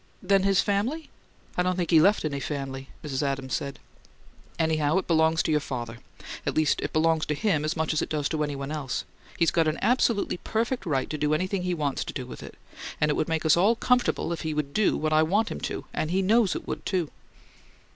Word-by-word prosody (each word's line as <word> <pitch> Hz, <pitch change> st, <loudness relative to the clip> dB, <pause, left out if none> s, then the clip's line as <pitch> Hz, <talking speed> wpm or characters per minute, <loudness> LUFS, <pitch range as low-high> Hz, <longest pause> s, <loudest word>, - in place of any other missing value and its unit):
"Then 195 Hz, +1 st, +4 dB
his 195 Hz, 0 st, +3 dB
family 230 Hz, +11 st, -1 dB, 0.2 s
" -, -, -29 dB
"I -, -, +3 dB
don't 180 Hz, 0 st, +1 dB
think 175 Hz, -2 st, -2 dB
he 160 Hz, -2 st, +7 dB
left 200 Hz, 0 st, +3 dB
any 140 Hz, -2 st, -2 dB
family," 135 Hz, -2 st, -5 dB
Mrs. 135 Hz, -4 st, -2 dB
Adams 135 Hz, -2 st, -2 dB
said. 140 Hz, -1 st, -3 dB, 0.8 s
"Anyhow, 160 Hz, 0 st, +2 dB
it 190 Hz, -, 0 dB
belongs 160 Hz, -1 st, +3 dB
to -, -, 0 dB
your 150 Hz, -, +3 dB
father. 120 Hz, -5 st, -5 dB, 0.4 s
At -, -, -2 dB
least 155 Hz, -1 st, +2 dB
it -, -, -3 dB
belongs 160 Hz, 0 st, +2 dB
to 150 Hz, -, 0 dB
him 155 Hz, -2 st, +1 dB
as 155 Hz, +2 st, -1 dB
much 160 Hz, 0 st, 0 dB
as 155 Hz, -, +1 dB
it -, -, -3 dB
does 150 Hz, -2 st, 0 dB
to 155 Hz, -2 st, -1 dB
any 145 Hz, -1 st, -3 dB
one 140 Hz, +1 st, -5 dB
else. 145 Hz, -5 st, -3 dB, 0.3 s
He's 165 Hz, -, +3 dB
got 165 Hz, -2 st, +2 dB
an 155 Hz, -, 0 dB
absolutely 235 Hz, -6 st, +2 dB
perfect 230 Hz, +1 st, -2 dB
right 135 Hz, -4 st, 0 dB
to 155 Hz, -, -3 dB
do 150 Hz, 0 st, +2 dB
anything 185 Hz, +3 st, -1 dB
he 180 Hz, 0 st, -1 dB
wants 145 Hz, -4 st, -1 dB
to 130 Hz, -, -5 dB
with 125 Hz, -, -9 dB
it, -, -, -10 dB, 0.4 s
and 150 Hz, 0 st, +2 dB
it -, -, +2 dB
would 155 Hz, -, -1 dB
make 160 Hz, 0 st, -1 dB
us 155 Hz, -, +6 dB
all 200 Hz, +7 st, +4 dB
comfortable 245 Hz, -8 st, +1 dB
if 165 Hz, -, -5 dB
he'd 150 Hz, -3 st, -2 dB
do 215 Hz, +3 st, +2 dB
what 155 Hz, 0 st, 0 dB
I 155 Hz, -, +5 dB
want 200 Hz, +8 st, +2 dB
him -, -, -6 dB
to -, -, -5 dB
and 155 Hz, -, -1 dB
he 190 Hz, +3 st, +1 dB
KNOWS 215 Hz, +1 st, +3 dB
it -, -, -6 dB
would, -, -, -4 dB
too!" 180 Hz, -6 st, -1 dB
160 Hz, 235 wpm, -26 LUFS, 150-185 Hz, 0.8 s, he